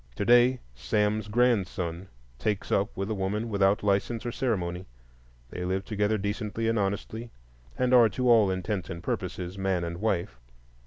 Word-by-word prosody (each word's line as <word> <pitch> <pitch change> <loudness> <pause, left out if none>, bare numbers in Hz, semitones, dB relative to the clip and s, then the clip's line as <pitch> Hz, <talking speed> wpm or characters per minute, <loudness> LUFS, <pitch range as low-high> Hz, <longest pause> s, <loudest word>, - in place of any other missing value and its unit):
To 100 - -2
day 120 +2 +5
Sam's 105 - 0
grandson 95 -6 0 0.3
"takes 105 -2 -2
up" 100 0 0
with 100 +3 -2
a - - +1
woman 105 +3 -2
without 100 -1 +2
license 105 +4 0
or 120 - -2
ceremony; 90 -8 -2 0.6
they 90 - -5
live 95 +2 -2
together 105 0 0
decently 105 +2 -2
and 115 -1 +1
honestly, 105 +4 -3 0.5
and 125 0 +1
are, 120 -3 +7
to 125 +5 -1
all 115 -5 +6
intents 95 -1 -2
and 85 0 -6
purposes, 90 +2 -4
man 95 -2 0
and 85 0 -4
wife. 90 - -1
100 Hz, 160 wpm, -28 LUFS, 95-115 Hz, 0.6 s, are